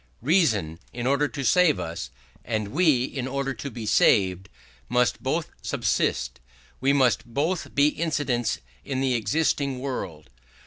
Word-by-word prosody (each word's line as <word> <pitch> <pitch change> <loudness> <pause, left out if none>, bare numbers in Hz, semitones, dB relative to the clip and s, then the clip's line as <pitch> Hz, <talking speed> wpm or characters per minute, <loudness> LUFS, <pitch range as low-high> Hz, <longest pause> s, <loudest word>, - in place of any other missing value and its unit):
Reason, 115 - +2
in 120 0 -5
order 140 +3 +2
to 140 -1 -5
save 175 +2 +4
us, 80 -6 -5 0.3
and 110 -3 -2
we, 150 - +3
in 130 -1 -4
order 135 0 -2
to 140 +3 -6
be 115 -3 -7
saved, 95 -2 +3 0.4
must 125 0 +1
both - - -2
subsist: - - -1 0.4
we 135 +2 +3
must 130 -4 +3
both 145 +10 -2
be 145 +1 +5
incidents 145 -7 -1 0.3
in 130 - -3
the 135 -1 +1
existing 140 +3 0
world. 85 - -5
130 Hz, 140 wpm, -25 LUFS, 110-145 Hz, 0.4 s, be